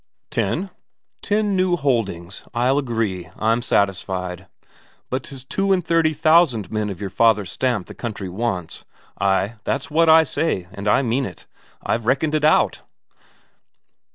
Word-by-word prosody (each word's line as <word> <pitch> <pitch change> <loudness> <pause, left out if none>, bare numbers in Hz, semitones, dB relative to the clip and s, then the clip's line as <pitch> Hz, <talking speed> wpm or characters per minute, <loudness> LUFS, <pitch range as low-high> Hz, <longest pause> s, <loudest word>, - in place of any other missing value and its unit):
"Ten." 165 - -1 0.5
"Ten 210 -1 0
new 185 -1 +2
holdings. 110 - -2
I'll 130 +4 +2
agree. 110 - -2
I'm 115 +2 +1
satisfied. 95 -3 -1 0.6
But 130 +1 -1
'tis 135 -1 -10
two 195 +7 0
and 180 -3 +2
thirty 165 -2 +3
thousand 155 - +3
men 110 -1 -1
of 95 -3 -6
your 100 -2 -5
father's 105 -5 +2
stamp 120 -8 -1
the - - -10
country 105 -5 -5
wants. 95 -3 -3 0.4
Ay, 100 +3 +1
that's 140 +2 -2
what 165 +1 +4
I 160 0 +8
say, 140 - -1
and 100 0 -6
I 115 +6 +4
mean 130 +2 0
it; - - -12 0.4
I've 115 0 -1
reckoned 140 +4 +1
it 155 -1 +1
out." 155 - +3
120 Hz, 150 wpm, -21 LUFS, 100-155 Hz, 0.6 s, I